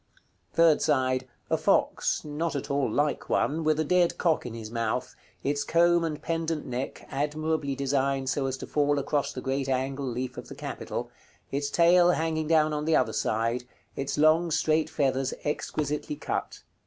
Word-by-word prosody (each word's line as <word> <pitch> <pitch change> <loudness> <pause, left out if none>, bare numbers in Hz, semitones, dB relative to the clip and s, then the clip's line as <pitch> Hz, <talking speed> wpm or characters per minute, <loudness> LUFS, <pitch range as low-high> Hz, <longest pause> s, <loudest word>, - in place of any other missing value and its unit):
Third 165 -2 +4
side. 130 -3 +1 0.2
A - - +3
fox, - - +1
not 150 +2 -2
at 140 +1 -3
all 140 -3 +1
like 145 +5 0
one, 160 +3 +1
with 155 0 +2
a - - +3
dead 175 +2 +2
cock 160 -7 +1
in 115 - -7
his 110 -1 -7
mouth, 115 +1 -2 0.3
its 145 +1 0
comb 170 0 +3
and 155 -2 -2
pendent 165 -2 -2
neck 125 +1 -5
admirably 150 0 -1
designed 135 0 0
so 135 0 0
as 130 0 -3
to - - -7
fall 145 -1 +1
across 140 0 0
the 130 - -6
great 135 +1 -2
angle 135 +1 -1
leaf 125 +1 -4
of - - -10
the - - -9
capital, - - -5 0.4
its 140 +1 -1
tail 175 +3 +5
hanging 160 -1 -1
down 155 -1 +3
on 150 0 -2
the 160 0 +3
other 110 - +2
side, 115 +3 0 0.3
its 135 0 -3
long 155 +3 +4
straight 160 0 +1
feathers 135 -2 0
exquisitely 150 0 -2
cut. 145 - -4
145 Hz, 175 wpm, -27 LUFS, 135-155 Hz, 0.4 s, tail